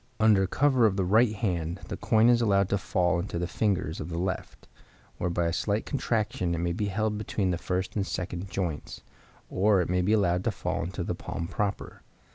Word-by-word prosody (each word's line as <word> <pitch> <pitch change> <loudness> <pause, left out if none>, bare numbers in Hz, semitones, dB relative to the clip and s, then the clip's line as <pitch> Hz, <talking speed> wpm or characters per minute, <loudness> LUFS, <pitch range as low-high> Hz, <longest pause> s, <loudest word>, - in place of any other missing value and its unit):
Under 105 -3 +4
cover 130 +1 +3
of 100 - 0
the 95 - +2
right 110 +4 +4
hand 85 -5 -2
the - - -3
coin 110 +1 +3
is 120 -1 +5
allowed 100 -4 +3
to 100 - +1
fall 90 -2 +1
into 85 -1 -4
the 90 - -1
fingers 90 -4 -1
of 75 - -6
the 85 - -4
left, 95 +1 -4 0.5
where 90 - 0
by 85 0 0
a 85 - 0
slight 105 +4 -1
contraction 110 - -1
it - - -3
may 85 +1 -1
be 105 +4 -1
held 105 +1 -1
between 100 -3 -1
the 85 - -1
first 90 +1 -2
and 100 -2 -1
second 90 +1 -4
joints, 90 -6 -4 0.5
or 100 +1 +3
it 90 - 0
may 90 0 +2
be 100 +4 +2
allowed 90 -4 +2
to 115 - +2
fall 90 - -3
into 85 +2 -4
the - - -2
palm 85 - -5
proper. 100 +2 -3
95 Hz, 215 wpm, -28 LUFS, 90-105 Hz, 0.5 s, is